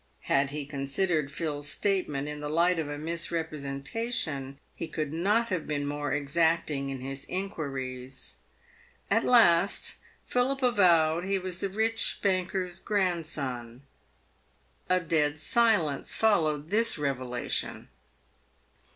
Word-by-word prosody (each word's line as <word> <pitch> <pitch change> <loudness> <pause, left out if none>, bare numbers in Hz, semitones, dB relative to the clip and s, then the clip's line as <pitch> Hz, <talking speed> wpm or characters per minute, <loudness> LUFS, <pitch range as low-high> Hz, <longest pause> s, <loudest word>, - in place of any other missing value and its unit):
Had 135 0 +2
he 145 0 -4
considered 145 +3 -1
Phil's 145 -2 -3
statement 165 -8 0
in 150 0 -5
the 150 0 -4
light 170 +3 +3
of 155 -2 -2
a 145 - -4
misrepresentation 155 - -3 0.2
he 165 - -5
could 155 -2 -3
not 210 +8 +2
have 180 -5 -2
been 145 -1 -1
more 145 0 -2
exacting 150 -1 +1
in 135 -2 -5
his 135 +1 -5
inquiries. 135 -9 -4 0.7
At - - +4
last 195 -6 +4 0.3
Philip 260 +2 0
avowed 175 -8 +4
he 195 0 +1
was 185 -1 -4
the 195 - -1
rich 220 +3 +1
banker's 185 -1 0
grandson. 150 - -2 1.1
A 185 0 +4
dead 155 -3 +1
silence 165 -3 +2
followed 160 -7 +2
this 225 0 +3
revelation. 130 -4 -2
160 Hz, 115 wpm, -29 LUFS, 140-190 Hz, 1.1 s, At